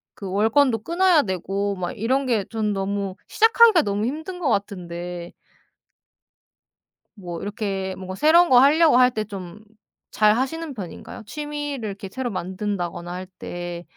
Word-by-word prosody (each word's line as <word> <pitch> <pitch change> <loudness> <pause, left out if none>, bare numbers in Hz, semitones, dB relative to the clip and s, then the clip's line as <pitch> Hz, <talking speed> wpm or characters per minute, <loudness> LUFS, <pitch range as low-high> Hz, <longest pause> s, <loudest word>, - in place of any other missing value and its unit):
그 195 -2 -7
월권도 225 +3 +2
끊어야 345 -1 +3
되고 195 +1 -2
막 180 -2 -3
이런 260 +6 0
게 225 -6 0
전 220 -2 -1
너무 195 -1 -2
시작하기가 450 -5 +5
너무 205 +1 -1
힘든 315 +8 -5
것 335 - -1
같은데 175 -4 -4 1.8
뭐 175 -5 -7
이렇게 195 -2 -3
뭔가 185 0 -7
새로운 330 - +5
거 250 - +7
할려고 300 +1 +5
할 250 0 +5
때 215 -3 -2
좀 195 -2 -9 0.6
잘 215 +1 +4
하시는 310 +2 -3
편인가요? 205 +3 -8
취미를 290 -2 -5
이렇게 200 0 -7
새로 250 +5 -4
만든다거나 185 -2 -4
할 180 +1 -5
때 175 0 -6
210 Hz, 290 characters per minute, -23 LUFS, 190-275 Hz, 1.8 s, 거